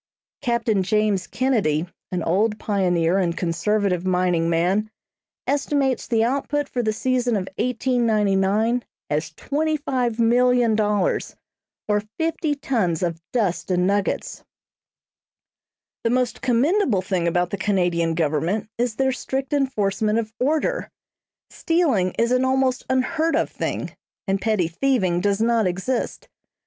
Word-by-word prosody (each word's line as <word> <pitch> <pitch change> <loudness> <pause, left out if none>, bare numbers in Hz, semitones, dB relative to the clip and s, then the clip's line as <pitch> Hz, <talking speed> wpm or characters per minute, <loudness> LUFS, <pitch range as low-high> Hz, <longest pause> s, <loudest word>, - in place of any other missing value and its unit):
Captain 235 -6 +1
James 205 -1 +1
Kennedy, 210 - +1 0.3
an 180 -2 -2
old 210 +5 +1
pioneer 180 -4 +1
and 175 -2 0
conservative 180 +1 0
mining 180 -2 +1
man, 180 +6 +1 0.6
estimates 280 -2 0
the 225 -2 +2
output 280 +3 -1
for 250 - -2
the 220 -2 0
season 245 +1 0
of 190 -2 -2
1899 225 -3 +1 0.3
as 150 +2 0
$25,000,000, 245 - +1 0.5
or 210 -1 +2 0.2
fifty 320 -2 0
tons 210 - -1
of 170 -2 -2
dust 205 -9 -1
and 180 -1 +2
nuggets. 200 +1 -1 1.6
The 230 - +2
most 250 0 0
commendable 255 - +2
thing 185 -3 -1
about 175 +1 0
the 200 - -2
Canadian 175 -4 +1
Government 170 +7 -1
is 240 -2 0
their 265 +1 +1
strict 265 +1 -3
enforcement 215 -6 +1
of 225 -1 -3
order. 315 - 0 0.6
Stealing 280 - +1
is 235 +1 +2
an 255 +1 +3
almost 260 -1 +1
unheard 260 +6 +1
of - - 0
thing, - - -4 0.3
and 195 0 0
petty 215 -6 +1
thieving 185 -2 +1
does 200 +1 +1
not 230 -3 +2
exist. 190 +8 -3
215 Hz, 120 wpm, -23 LUFS, 185-255 Hz, 1.6 s, an